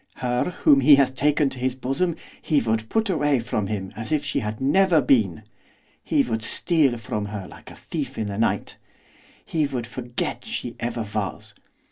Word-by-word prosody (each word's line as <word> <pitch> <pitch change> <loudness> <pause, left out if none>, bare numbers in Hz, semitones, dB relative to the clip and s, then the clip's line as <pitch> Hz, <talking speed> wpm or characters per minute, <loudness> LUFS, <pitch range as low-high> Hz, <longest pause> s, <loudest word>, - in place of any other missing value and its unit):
Her 125 -1 0 0.2
whom 140 -2 +6
he 145 +2 +8
has 135 -2 +3
taken 145 +1 +1
to 130 - -7
his 130 0 -1
bosom 135 +7 -1 0.3
he 150 -3 +2
would 110 -2 -1
put 225 0 +1
away 145 -7 +2
from 110 -3 -2
him 95 -2 -4
as 115 +7 -5
if 150 -2 +1
she 135 - 0
had 105 0 -4
never 165 +5 +4
been, 110 - +2 0.6
he - - +2
would 115 -2 -2
steal 145 - +2
from 105 -2 -4
her 100 -2 -6
like - - -13
a - - -12
thief - - -5
in 110 - -1
the 100 0 -4
night, 115 - 0 0.7
he 155 -3 0
would 125 -4 -4
forget 120 0 -4
she 120 -1 -4
ever 120 -1 -3
was! 105 -3 -4
125 Hz, 185 wpm, -24 LUFS, 110-145 Hz, 0.7 s, he